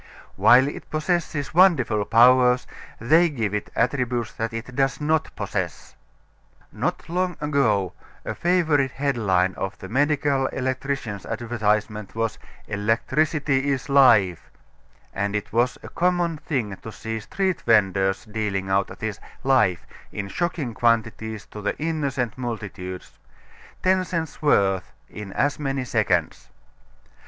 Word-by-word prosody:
While 120 +7 +6
it 145 - -7
possesses 155 -2 -1
wonderful 145 - +4
powers, 125 +3 +5 0.3
they 160 +9 +4
give 115 -9 -2
it 105 - -3
attributes 120 -2 0
that 115 +1 -3
it 115 +2 -7
does 135 -1 +1
not 155 +1 +1
possess. - - -4 0.8
Not - - -3
long 180 +1 -1
ago 120 - +1 0.3
a - - -3
favorite 160 -6 +2
headline 105 -10 +1
of 95 - -5
the 95 - -9
medical 140 +1 +1
electrician's 130 -5 -3
advertisement 110 -3 -1
was 115 -1 -2 0.3
"Electricity 135 +7 0
Is 140 +1 -2
Life," 115 - +4 0.6
and 100 +1 -2
it 105 - -4
was 120 +2 +2
a - - -8
common 175 -2 0
thing 120 -10 -3
to 115 - -9
see 110 +1 -5
street 190 - -2
venders 95 -2 +2
dealing 105 -3 -3
out 100 0 0
this 110 -2 -4 0.2
"life" 125 -10 +2 0.3
in 100 -1 -5
shocking 160 - -2
quantities 110 -2 0
to 105 - -10
the 105 - -2
innocent 140 -6 -2
multitudes 100 -6 -6 0.6
ten 185 0 +3
cents' 165 -4 -4
worth 95 - +2 0.2
in 105 -2 -8
as 145 +1 0
many 135 -3 -2
seconds. - - 0
120 Hz, 125 wpm, -24 LUFS, 105-145 Hz, 0.8 s, While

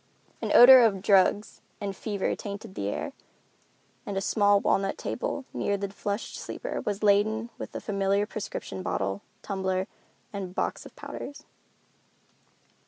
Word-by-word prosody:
An - - -2
odor 255 +1 +11
of 200 -5 +2
drugs 200 +1 +3 0.2
and 200 -2 -4
fever 205 -2 -2
tainted 205 0 -7
the 100 - -3
air, 100 - -3 0.9
and 200 -1 -4
a - - +3
small 205 0 +3
walnut 195 0 +1
table 260 +2 -3
near 200 - 0
the 200 0 -3
flushed 200 +2 -4
sleeper - - -5
was 205 0 -3
laden 215 +3 +2
with - - -6
the - - -5
familiar 200 0 +1
prescription 195 - -6
bottle, 95 +1 -2 0.2
tumbler 190 -1 -1 0.5
and 190 -2 -5
box - - -2
of - - -18
powders. 285 - -8
200 Hz, 140 wpm, -27 LUFS, 195-210 Hz, 0.9 s, odor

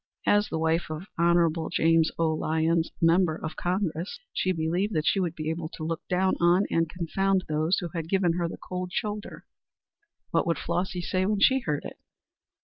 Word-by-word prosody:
As 205 0 +3
the - - -2
wife 160 +1 0
of 155 +3 -5
Hon. 170 -1 +2
James 165 0 +3
O. 160 -1 +2
Lyons, 160 +1 +1
Member 165 0 +4
of 155 0 -6
Congress, 180 -1 -2 0.2
she 185 - +1
believed 175 +5 -1
that 155 -1 0
she 195 - +3
would 175 -3 -1
be 155 0 -2
able 160 -1 -4
to 155 - -7
look 165 +1 -2
down 185 0 +2
on 175 +3 +4
and 165 -1 +1
confound 185 +3 0
those 155 +4 +1
who 175 - -3
had 165 -2 -4
given 185 -3 +2
her 170 0 -1
the - - -7
cold 180 0 -5
shoulder. 210 +2 -4 0.9
What - - +1
would 165 - +1
Flossy 180 0 -2
say 185 +2 0
when 210 -1 +1
she 265 +6 +5
heard 150 - -3
it? - - -8
170 Hz, 190 wpm, -27 LUFS, 160-185 Hz, 0.9 s, she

